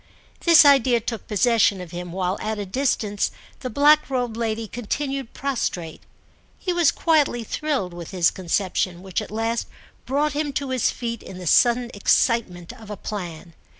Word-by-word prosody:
This 335 -3 +7
idea 260 -4 +5
took 230 0 -5
possession 210 -1 +3
of 180 -2 -8
him 175 0 -6
while, 185 +1 -1
at 220 0 -2
a 205 - -4
distance, 210 -2 0 0.3
the 255 - -5
black 295 +5 +4
robed 245 -4 -1
lady 225 -1 -2
continued 270 +3 -4
prostrate; 210 - -3 0.6
he 365 - -2
was 345 -4 +4
quietly 295 -7 +1
thrilled 255 - -2
with 170 -1 -8
his 180 -3 +2
conception, 185 -1 -1
which 190 -2 -2
at - - -8
last 225 +2 -2 0.4
brought 285 +3 +1
him 295 -1 -2
to 275 -1 -3
his 255 -3 +2
feet 235 -2 -4
in 190 - -10
the 180 - -8
sudden 240 +7 +3
excitement 200 -4 +1
of 220 -2 -13
a 210 - -5
plan. 175 -5 -6
230 Hz, 165 wpm, -23 LUFS, 190-270 Hz, 0.6 s, This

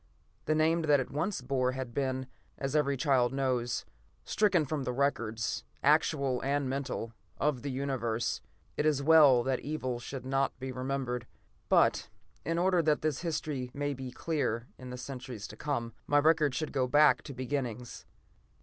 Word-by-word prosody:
The 155 - +2
name 160 +2 +3
that 150 -3 +4
it 130 - -4
once 160 +5 -1
bore 130 0 0
had 130 -2 -5
been, 130 -1 -1 0.3
as 135 +1 -3
every 140 -2 +2
child 130 -4 +3
knows, 130 -3 -1 0.4
stricken 190 -7 +2
from 150 +1 -2
the 125 -1 -2
records, 120 -5 -1 0.2
actual 140 -3 +3
and 140 0 0
mental, 130 -4 -3 0.2
of 145 -4 0
the 145 - -4
Universe. 130 -4 -1 0.4
It 150 - +2
is 145 -2 +2
well 145 -5 +7
that 130 0 0
evil 130 -4 -3
should 130 +1 -7
not 135 +1 0
be 130 0 -4
remembered. 130 -2 -3 0.4
But - - +3 0.3
in 165 0 -1
order 180 0 +3
that 155 -2 +2
this 155 -2 0
history 150 -6 -3
may 145 0 -1
be 130 -1 -6
clear 125 -5 -2
in 130 -1 -8
the 125 - -6
centuries 125 -4 -7
to - - -9
come, 120 -6 -3
my 145 - +3
record 150 -2 +4
should 155 +1 -2
go 130 -2 +1
back 150 +3 +5
to 140 - -8
beginnings. 125 -2 -4
135 Hz, 165 wpm, -31 LUFS, 125-150 Hz, 0.4 s, well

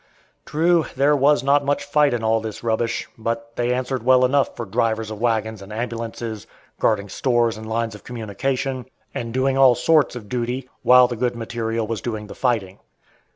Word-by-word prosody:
True, 165 +2 +2
there 140 +3 +3
was 140 -1 +3
not 140 +1 +3
much 145 0 0
fight 145 0 +3
in 120 -2 -2
all 110 0 +2
this 110 0 -7
rubbish, 115 +1 -1
but 115 +1 -4
they 120 0 0
answered 130 0 -1
well 130 +1 +5
enough 135 +2 +1
for 120 - -4
drivers 110 +2 -1
of 110 0 -7
wagons 110 -3 0
and 100 +2 -11
ambulances, 115 -1 -5 0.3
guarding 100 -2 +1
stores 120 +2 +1
and 110 0 -8
lines 115 0 -1
of 105 - -12
communication, 125 +3 -3 0.3
and 115 -1 -4
doing 130 +2 +1
all 130 -2 +7
sorts 155 -1 +3
of 115 -4 -8
duty, 125 +2 -3
while 125 0 +7
the 120 - -4
good 120 +1 -1
material 115 -1 -3
was 115 0 -4
doing 110 -3 -4
the 105 - -9
fighting. 110 -7 -1
120 Hz, 185 wpm, -22 LUFS, 110-130 Hz, 0.3 s, all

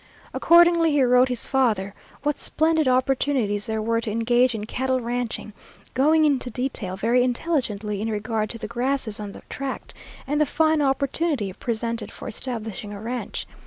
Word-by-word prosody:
Accordingly 340 -1 +5
he 285 -2 +4
wrote 250 +1 +5
his 250 -2 -2
father 220 -8 +1 0.3
what 295 0 0
splendid 315 -2 +1
opportunities 255 -4 +1
there 220 -1 -2
were 230 +1 +1
to 225 - -4
engage 240 +3 +2
in 210 -1 -4
cattle 260 +3 -1
ranching, 240 -2 -3 0.4
going 310 +4 +4
into 270 -4 +1
detail 240 -6 -3
very 235 +5 +3
intelligently 235 -7 -1
in 225 - -1
regard 215 0 -2
to 230 - -6
the 230 - -6
grasses 250 -3 -1
on 205 -1 -5
the - - -12
tract 275 0 -5 0.3
and 295 +2 0
the 300 - +3
fine 315 +1 +2
opportunity 275 - 0
presented 230 +2 -3
for - - -9
establishing 220 -4 -5
a 205 - -7
ranch. 235 +3 -4
245 Hz, 160 wpm, -24 LUFS, 220-275 Hz, 0.4 s, Accordingly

